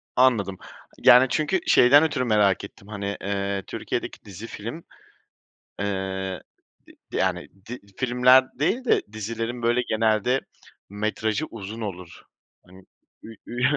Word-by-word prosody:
Anladım. 105 Hz, -7 st, +3 dB, 0.5 s
Yani, 125 Hz, +2 st, +8 dB
çünkü 155 Hz, +9 st, 0 dB
şeyden 140 Hz, +5 st, +7 dB
ötürü 145 Hz, -5 st, 0 dB
merak 105 Hz, -4 st, +2 dB
ettim, 100 Hz, 0 st, -12 dB
hani, 100 Hz, -1 st, -4 dB
ııı, 100 Hz, 0 st, -2 dB
Türkiye'deki -, -, -5 dB
dizi, 105 Hz, +3 st, -9 dB
film, 115 Hz, +12 st, -7 dB, 1.0 s
ııı, 95 Hz, -1 st, -3 dB, 0.7 s
d -, -, -3 dB
yani 90 Hz, -2 st, -1 dB, 0.2 s
di 125 Hz, -, -6 dB, 0.2 s
filmler 125 Hz, +1 st, +4 dB
değil 235 Hz, -, 0 dB
de -, -, +3 dB
dizilerin 115 Hz, +3 st, -4 dB
böyle 120 Hz, +1 st, +2 dB
genelde 110 Hz, +3 st, +1 dB, 0.5 s
metrajı 110 Hz, +6 st, -2 dB
uzun 110 Hz, +1 st, -8 dB
olur. 90 Hz, -5 st, -7 dB, 0.4 s
Hani, 95 Hz, +1 st, -16 dB, 0.4 s
ü 110 Hz, -1 st, -11 dB
ü 120 Hz, +1 st, -5 dB
110 Hz, 120 wpm, -24 LUFS, 100-125 Hz, 1.0 s, Yani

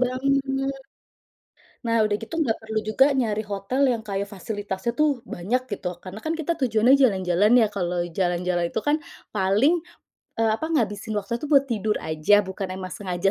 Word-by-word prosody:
banget. 270 Hz, +1 st, 0 dB, 1.1 s
Nah, 230 Hz, -1 st, +2 dB
udah 205 Hz, -, 0 dB
gitu 225 Hz, +7 st, -8 dB
nggak 235 Hz, -8 st, +1 dB
perlu 220 Hz, 0 st, -2 dB
juga 265 Hz, +6 st, +5 dB
nyari 220 Hz, -5 st, 0 dB
hotel 205 Hz, +6 st, -2 dB
yang 230 Hz, -, -2 dB
kayak 200 Hz, 0 st, -2 dB
fasilitasnya 205 Hz, +1 st, -4 dB
tuh 295 Hz, -4 st, +2 dB
banyak 230 Hz, +9 st, -1 dB
gitu, 195 Hz, -2 st, -3 dB
karena 190 Hz, +4 st, -9 dB
kan 320 Hz, -, 0 dB
kita 330 Hz, +1 st, -1 dB
tujuannya 240 Hz, -1 st, +4 dB
jalan-jalan 200 Hz, -5 st, +3 dB
ya, 220 Hz, -, +5 dB
kalau 180 Hz, -3 st, -2 dB
jalan-jalan 175 Hz, 0 st, 0 dB
itu -, -, -1 dB
kan 290 Hz, +5 st, +2 dB, 0.4 s
paling, 215 Hz, -, +3 dB, 0.6 s
eee, 225 Hz, -1 st, +3 dB
apa 315 Hz, -, -4 dB
ngabisin 220 Hz, -7 st, -1 dB
waktunya 235 Hz, +4 st, -4 dB
tuh 300 Hz, -, -5 dB
buat 280 Hz, -2 st, +6 dB
tidur 215 Hz, -4 st, -1 dB
aja, 160 Hz, +7 st, +3 dB
bukan 190 Hz, 0 st, -4 dB
emang 185 Hz, -1 st, -6 dB
sengaja 185 Hz, -1 st, -1 dB
215 Hz, 165 wpm, -24 LUFS, 190-260 Hz, 1.1 s, buat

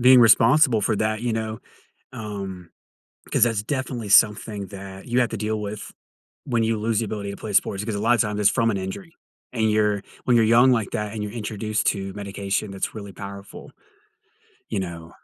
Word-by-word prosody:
being 125 Hz, +1 st, +8 dB
responsible 115 Hz, +2 st, +5 dB
for 105 Hz, +1 st, +1 dB
that, 110 Hz, +1 st, -1 dB
you 120 Hz, -2 st, 0 dB
know. 110 Hz, -1 st, -3 dB, 0.5 s
Um, 100 Hz, -6 st, -7 dB, 0.6 s
'cause -, -, +3 dB
that's 115 Hz, -3 st, +1 dB
definitely 125 Hz, -2 st, -3 dB
something 105 Hz, -1 st, +3 dB
that 95 Hz, 0 st, -10 dB
you 120 Hz, +1 st, +1 dB
have 120 Hz, -, +2 dB
to -, -, -3 dB
deal 110 Hz, 0 st, -2 dB
with, 105 Hz, 0 st, -6 dB, 0.5 s
when 120 Hz, -4 st, +1 dB
you 110 Hz, -1 st, 0 dB
lose 110 Hz, 0 st, 0 dB
the 115 Hz, -, -1 dB
ability 100 Hz, -1 st, -4 dB
to -, -, -7 dB
play 105 Hz, -2 st, -6 dB
sports. 100 Hz, +1 st, +1 dB
Because 110 Hz, -2 st, -3 dB
a -, -, -3 dB
lot 120 Hz, +3 st, +3 dB
times 105 Hz, 0 st, 0 dB
that's 100 Hz, -1 st, +4 dB
from 115 Hz, -1 st, +1 dB
an 100 Hz, -, -1 dB
injury. 165 Hz, -, -6 dB, 0.4 s
And 110 Hz, -2 st, +1 dB
you're 105 Hz, -1 st, +2 dB, 0.2 s
when 125 Hz, -, +3 dB
you're 110 Hz, -, +4 dB
young 120 Hz, +3 st, +6 dB
like 115 Hz, -5 st, 0 dB
that 105 Hz, 0 st, -3 dB
and 110 Hz, -, -4 dB
you're 105 Hz, -1 st, -4 dB
introduced 110 Hz, -1 st, -2 dB
to 95 Hz, -1 st, -1 dB
medication 100 Hz, 0 st, -3 dB
that's 95 Hz, +3 st, -4 dB
really 100 Hz, -2 st, -7 dB
powerful. 100 Hz, +1 st, -10 dB, 1.0 s
You 95 Hz, -, -2 dB
know? 85 Hz, -2 st, -7 dB
105 Hz, 195 wpm, -23 LUFS, 100-115 Hz, 1.0 s, being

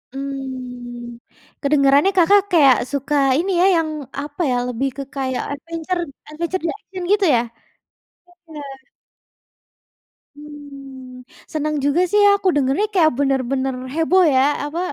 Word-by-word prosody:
Mmm, 250 Hz, -3 st, -7 dB, 0.4 s
kedengerannya 280 Hz, +4 st, +3 dB
Kakak 395 Hz, +4 st, +5 dB
kayak 280 Hz, -7 st, +6 dB
suka 280 Hz, +1 st, -2 dB, 0.2 s
ini 385 Hz, +3 st, -1 dB
ya, 370 Hz, -, +5 dB
yang 325 Hz, -2 st, 0 dB, 0.3 s
apa 290 Hz, +3 st, -7 dB
ya, -, -, +1 dB
lebih 250 Hz, +3 st, -2 dB
ke 275 Hz, -, -4 dB
kayak 260 Hz, -2 st, -2 dB
adventure 330 Hz, +4 st, -4 dB, 0.3 s
adventure, 340 Hz, +3 st, -4 dB
action 375 Hz, -4 st, -9 dB
gitu 410 Hz, -1 st, +3 dB
ya? 230 Hz, -, +3 dB, 1.1 s
Iya. 300 Hz, -2 st, -8 dB, 1.7 s
Mmm, 275 Hz, -4 st, -12 dB, 0.3 s
senang 305 Hz, 0 st, -1 dB
juga 285 Hz, +5 st, +2 dB
sih 415 Hz, 0 st, +4 dB
aku 390 Hz, -, -2 dB
dengarnya, 285 Hz, +9 st, +1 dB
kayak 330 Hz, -5 st, +4 dB
benar-benar 270 Hz, -1 st, 0 dB, 0.2 s
heboh 340 Hz, +4 st, +3 dB
ya. 260 Hz, -, +4 dB, 0.2 s
Apa, 315 Hz, +4 st, -4 dB
285 Hz, 120 wpm, -20 LUFS, 265-330 Hz, 1.7 s, kayak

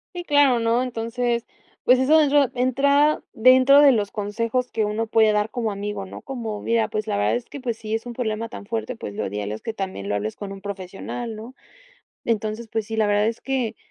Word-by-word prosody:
Sí, 350 Hz, -, -4 dB
claro, 285 Hz, -5 st, +4 dB
¿no? 230 Hz, +2 st, +2 dB
Entonces, 235 Hz, 0 st, -2 dB, 0.4 s
pues 250 Hz, +1 st, +6 dB
eso 295 Hz, +5 st, +5 dB
dentro 285 Hz, -3 st, +3 dB
entra 280 Hz, +4 st, +2 dB
dentro 255 Hz, +4 st, +6 dB
de 285 Hz, -, +8 dB
los 210 Hz, -5 st, 0 dB
consejos 230 Hz, +4 st, -2 dB
que 220 Hz, -2 st, 0 dB
uno 215 Hz, +2 st, -2 dB
puede 220 Hz, -1 st, +4 dB
dar 210 Hz, +1 st, +1 dB
como 230 Hz, -3 st, -2 dB
amigo, 200 Hz, 0 st, -4 dB
¿no? 190 Hz, -, -10 dB
Como: 230 Hz, -6 st, -5 dB
"Mira, 230 Hz, -1 st, +1 dB
pues 215 Hz, -1 st, -3 dB
la -, -, -1 dB
verdad 105 Hz, +2 st, +2 dB
es 120 Hz, -, -3 dB
que, 285 Hz, -, -9 dB
pues, 235 Hz, -3 st, -3 dB
si 220 Hz, 0 st, -3 dB
es 225 Hz, -, -4 dB
un 240 Hz, -, -6 dB
problema 225 Hz, -2 st, -2 dB
tan 205 Hz, -, -10 dB
fuerte, 230 Hz, +3 st, -3 dB
pues 105 Hz, -, -7 dB
lo -, -, -2 dB
ideal 105 Hz, +1 st, -4 dB
es 110 Hz, -, -6 dB
que 225 Hz, -, -4 dB
también 190 Hz, -, -5 dB
lo -, -, 0 dB
hables 105 Hz, +1 st, -2 dB
con 200 Hz, -1 st, -7 dB
un 195 Hz, -1 st, -9 dB
profesional", 200 Hz, +4 st, -6 dB
¿no? 230 Hz, +5 st, -10 dB, 0.7 s
Entonces, 220 Hz, 0 st, -2 dB
pues 220 Hz, -2 st, -2 dB
sí, 220 Hz, 0 st, -5 dB
la 215 Hz, -1 st, +3 dB
verdad 205 Hz, +1 st, +2 dB
es 230 Hz, 0 st, -2 dB
que, 250 Hz, -5 st, -2 dB
225 Hz, 225 wpm, -23 LUFS, 210-250 Hz, 0.7 s, de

